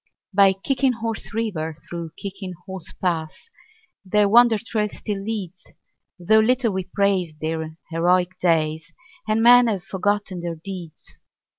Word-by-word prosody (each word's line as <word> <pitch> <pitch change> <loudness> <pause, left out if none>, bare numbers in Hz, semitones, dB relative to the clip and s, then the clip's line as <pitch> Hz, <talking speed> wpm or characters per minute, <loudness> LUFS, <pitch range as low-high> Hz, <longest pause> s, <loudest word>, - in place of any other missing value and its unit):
By 195 0 +6
Kicking 260 +6 0
Horse 225 -1 -4
River, 185 -8 -3
through 170 -2 -6
Kicking 195 -1 -6
Horse 190 -3 -5
Pass, 170 - -3 0.5
Their 205 +2 +2
wonder 235 +1 +6
trail 215 -1 -2
still 205 -1 -5
leads, 195 -4 -6 0.4
Though 205 +5 +4
little 240 0 +2
we 190 -1 -2
praise 185 -4 0
their 160 0 -4
heroic 180 +2 +1
days 160 -2 0 0.3
And 215 +1 +1
men 245 0 +8
have 200 -5 -1
forgotten 200 -1 -1
their 170 -1 -4
deeds. 170 -1 -10
190 Hz, 135 wpm, -22 LUFS, 170-220 Hz, 0.5 s, men